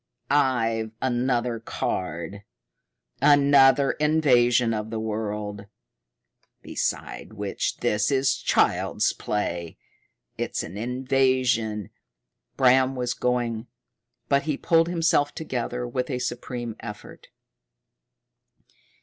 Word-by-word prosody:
I've 115 Hz, -6 st, +1 dB
another 120 Hz, -2 st, 0 dB
card 90 Hz, -3 st, -4 dB, 0.8 s
another 140 Hz, -1 st, +5 dB
invasion 125 Hz, -6 st, +3 dB
of 105 Hz, 0 st, -3 dB
the 110 Hz, 0 st, -3 dB
world 105 Hz, -2 st, -4 dB, 1.0 s
beside -, -, -4 dB
which 105 Hz, -2 st, -3 dB
this 105 Hz, 0 st, +1 dB
is 135 Hz, -1 st, +2 dB
child's 125 Hz, -, +1 dB
play. 85 Hz, -5 st, -3 dB, 0.6 s
It's -, -, -2 dB
an 85 Hz, -, -8 dB
invasion 125 Hz, -3 st, 0 dB, 0.3 s
" -, -, -53 dB
Bram 130 Hz, +1 st, +4 dB
was 125 Hz, -1 st, -1 dB
going, 120 Hz, -3 st, -1 dB, 0.6 s
but 140 Hz, 0 st, +2 dB
he 145 Hz, -, 0 dB
pulled 165 Hz, 0 st, +3 dB
himself 165 Hz, -4 st, +1 dB
together 125 Hz, -4 st, -3 dB
with 125 Hz, +2 st, -3 dB
a 130 Hz, -, -1 dB
supreme 120 Hz, -2 st, -4 dB
effort. 105 Hz, -2 st, -10 dB
125 Hz, 95 wpm, -25 LUFS, 110-135 Hz, 1.0 s, another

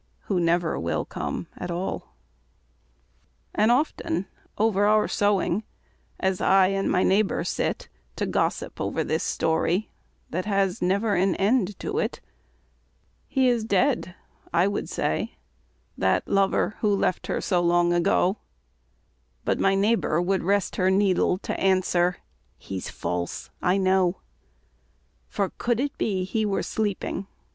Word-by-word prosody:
Who 190 Hz, -3 st, -1 dB
never 170 Hz, -1 st, +1 dB
will 85 Hz, +1 st, -1 dB
come -, -, -4 dB
at -, -, -6 dB
all. 175 Hz, +2 st, -4 dB, 1.4 s
And 215 Hz, +3 st, +3 dB
often 240 Hz, -, 0 dB, 0.3 s
over 205 Hz, -1 st, +3 dB
our 215 Hz, 0 st, +4 dB
sewing, 205 Hz, -1 st, +1 dB, 0.6 s
As 190 Hz, -1 st, 0 dB
I 190 Hz, -1 st, +5 dB
and 195 Hz, 0 st, 0 dB
my 180 Hz, -, +3 dB
neighbour 195 Hz, +2 st, +2 dB
sit -, -, -2 dB, 0.3 s
To -, -, -1 dB
gossip -, -, -1 dB
over -, -, -1 dB
this -, -, -1 dB
story 165 Hz, +5 st, 0 dB, 0.4 s
That 185 Hz, +2 st, -2 dB
has 195 Hz, -3 st, 0 dB
never 200 Hz, +4 st, +1 dB
an 190 Hz, 0 st, +2 dB
end 205 Hz, -1 st, +1 dB
to 420 Hz, +2 st, -2 dB
it, -, -, -2 dB, 1.1 s
"He 265 Hz, -2 st, +2 dB
is 240 Hz, -3 st, +2 dB
dead," 235 Hz, -5 st, +1 dB, 0.4 s
I 170 Hz, +3 st, +3 dB
would 200 Hz, -, -3 dB
say, -, -, -2 dB, 0.6 s
"that -, -, +1 dB
lover, 195 Hz, +1 st, +1 dB
Who 210 Hz, -2 st, +2 dB
left 185 Hz, -, -1 dB
her -, -, -1 dB
so 180 Hz, -2 st, +1 dB
long 175 Hz, 0 st, +3 dB
ago," 180 Hz, +3 st, +2 dB, 1.1 s
But -, -, +1 dB
my 195 Hz, 0 st, +3 dB
neighbour 200 Hz, -5 st, +2 dB
would 185 Hz, +2 st, +1 dB
rest 200 Hz, +2 st, 0 dB
her 185 Hz, 0 st, +3 dB
needle 190 Hz, -2 st, +2 dB
To -, -, -4 dB
answer, 180 Hz, -2 st, +2 dB, 0.4 s
"He's 95 Hz, -2 st, -6 dB
false 90 Hz, 0 st, -4 dB
I 180 Hz, +2 st, +2 dB
know." 190 Hz, -1 st, +2 dB, 1.1 s
"For 200 Hz, -2 st, -2 dB
could 240 Hz, -1 st, +1 dB
it 280 Hz, +1 st, -1 dB
be 190 Hz, -4 st, 0 dB
he 215 Hz, +4 st, -1 dB
were 205 Hz, -2 st, 0 dB
sleeping. 200 Hz, -2 st, -2 dB
195 Hz, 135 wpm, -25 LUFS, 180-210 Hz, 1.4 s, I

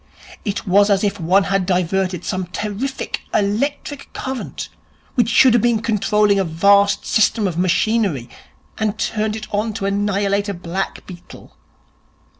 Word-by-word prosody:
It 200 Hz, -2 st, -3 dB
was 200 Hz, +2 st, +4 dB
as 200 Hz, 0 st, +2 dB
if 205 Hz, 0 st, -1 dB
one 185 Hz, +4 st, +3 dB
had 195 Hz, -1 st, 0 dB
diverted 185 Hz, -1 st, 0 dB
some 185 Hz, -1 st, -2 dB
terrific 215 Hz, +8 st, -4 dB
electric 275 Hz, +7 st, -1 dB
current 265 Hz, -1 st, -5 dB, 0.5 s
which 235 Hz, -3 st, +2 dB
should 245 Hz, +2 st, +5 dB
have 240 Hz, -, +4 dB
been 235 Hz, -1 st, +2 dB
controlling 210 Hz, -2 st, +2 dB
a -, -, +2 dB
vast 200 Hz, +4 st, +3 dB
system 220 Hz, 0 st, +2 dB
of 175 Hz, -, -3 dB
machinery, 185 Hz, -, +1 dB, 0.5 s
and 215 Hz, -1 st, -1 dB
turned 215 Hz, 0 st, -1 dB
it 215 Hz, -1 st, -6 dB
on 215 Hz, +2 st, -1 dB
to 200 Hz, -2 st, -4 dB
annihilate 200 Hz, 0 st, 0 dB
a 200 Hz, -, -3 dB
black 175 Hz, +2 st, -4 dB
beetle. 175 Hz, -2 st, -13 dB
200 Hz, 145 wpm, -19 LUFS, 190-215 Hz, 0.5 s, should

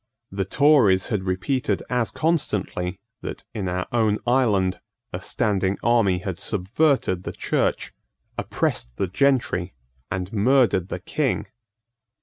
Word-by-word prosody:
The 95 Hz, 0 st, -2 dB
Tories 120 Hz, -6 st, +4 dB
had 105 Hz, -5 st, -1 dB
repeated 95 Hz, +10 st, -1 dB
as 125 Hz, -2 st, 0 dB
constantly 105 Hz, -, -1 dB, 0.2 s
that, -, -, -6 dB
in 105 Hz, -5 st, -3 dB
our 90 Hz, +1 st, -2 dB
own 110 Hz, -3 st, +2 dB
island, 105 Hz, -7 st, +2 dB, 0.3 s
a 90 Hz, -, -4 dB
standing 100 Hz, -3 st, 0 dB
army 115 Hz, -6 st, +3 dB
had 90 Hz, -1 st, -5 dB
subverted 105 Hz, -, +1 dB
the -, -, -5 dB
Church, -, -, -1 dB, 0.4 s
oppressed -, -, -2 dB
the 95 Hz, -, 0 dB
gentry, 105 Hz, -, +1 dB, 0.3 s
and 95 Hz, +2 st, -4 dB
murdered 110 Hz, -4 st, +3 dB
the -, -, -5 dB
King. -, -, -1 dB
100 Hz, 125 wpm, -24 LUFS, 95-125 Hz, 0.4 s, Tories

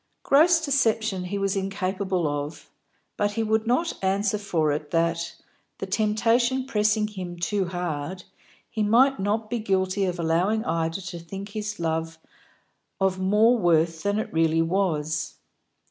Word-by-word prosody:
Gross 325 Hz, +5 st, +5 dB
deception 225 Hz, -8 st, +1 dB
he 200 Hz, +3 st, -3 dB
was 195 Hz, 0 st, 0 dB
incapable 190 Hz, -2 st, -1 dB
of, 145 Hz, +1 st, -5 dB, 0.5 s
but 205 Hz, 0 st, 0 dB
he 225 Hz, -, -1 dB
would 220 Hz, +1 st, 0 dB
not 330 Hz, +8 st, 0 dB
answer 200 Hz, +2 st, +1 dB
for 165 Hz, -7 st, 0 dB
it 150 Hz, 0 st, -3 dB
that, 170 Hz, +1 st, 0 dB, 0.4 s
the -, -, -4 dB
temptation 230 Hz, +5 st, +1 dB
pressing 210 Hz, -3 st, +1 dB
him 185 Hz, -4 st, -7 dB
too 190 Hz, +3 st, 0 dB
hard, 175 Hz, 0 st, -4 dB, 0.4 s
he 220 Hz, -, -4 dB
might 245 Hz, +6 st, +4 dB
not 210 Hz, +3 st, -1 dB
be 235 Hz, +2 st, -2 dB
guilty 190 Hz, -1 st, 0 dB
of 180 Hz, -1 st, -2 dB
allowing 175 Hz, +7 st, +1 dB
Ida 165 Hz, +2 st, -1 dB
to 180 Hz, -2 st, -7 dB
think 195 Hz, +4 st, -8 dB
his 210 Hz, -1 st, -5 dB
love 165 Hz, 0 st, -2 dB, 0.8 s
of 190 Hz, -1 st, +1 dB
more 215 Hz, +6 st, +4 dB
worth 165 Hz, -2 st, +2 dB
than 205 Hz, 0 st, 0 dB
it 215 Hz, -, -3 dB
really 165 Hz, 0 st, +3 dB
was. 160 Hz, -4 st, -1 dB
195 Hz, 145 wpm, -25 LUFS, 170-215 Hz, 0.8 s, Gross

